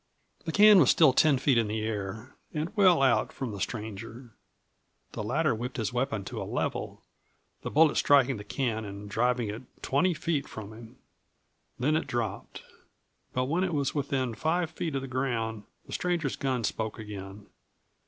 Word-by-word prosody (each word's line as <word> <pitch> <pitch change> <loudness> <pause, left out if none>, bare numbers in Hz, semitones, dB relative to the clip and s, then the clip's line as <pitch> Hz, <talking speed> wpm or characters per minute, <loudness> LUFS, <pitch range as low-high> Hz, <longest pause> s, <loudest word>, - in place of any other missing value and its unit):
The 165 - -2
can 210 +1 +8
was 140 - +5
still 155 -6 +6
ten 145 0 +4
feet 130 -2 +3
in 115 - +1
the 110 +1 -2
air 110 +3 -4 0.2
and 155 +7 -3
well 185 -8 +5
out 130 -3 +3
from 130 -4 -5
the 100 -2 -7
stranger. 110 +3 -6 0.8
The - - -5
latter 140 +8 +1
whipped 120 +3 -5
his 115 0 -2
weapon 120 -5 -1
to - - -5
a - - -2
level, - - -3 0.6
the - - -4
bullet 155 0 +4
striking 135 -3 +4
the 105 - -8
can 110 0 -2
and 100 0 -8
driving 120 +1 0
it 110 +4 -5 0.2
twenty 175 +6 +2
feet 155 -4 -1
from 110 0 -8
him. 115 0 -13 0.8
Then 150 +5 +1
it 160 - -1
dropped. 120 -4 -4 0.7
But 125 0 0
when 165 +7 0
it 175 -4 -1
was 140 -2 0
within 135 -4 -1
five 160 +7 0
feet 160 -2 -4
of 135 - -2
the - - -5
ground 115 -5 -2 0.2
the - - -10
stranger's 170 -6 -1
gun 130 -3 -1
spoke 110 0 -2
again. 100 -1 -8
125 Hz, 175 wpm, -28 LUFS, 110-150 Hz, 0.8 s, can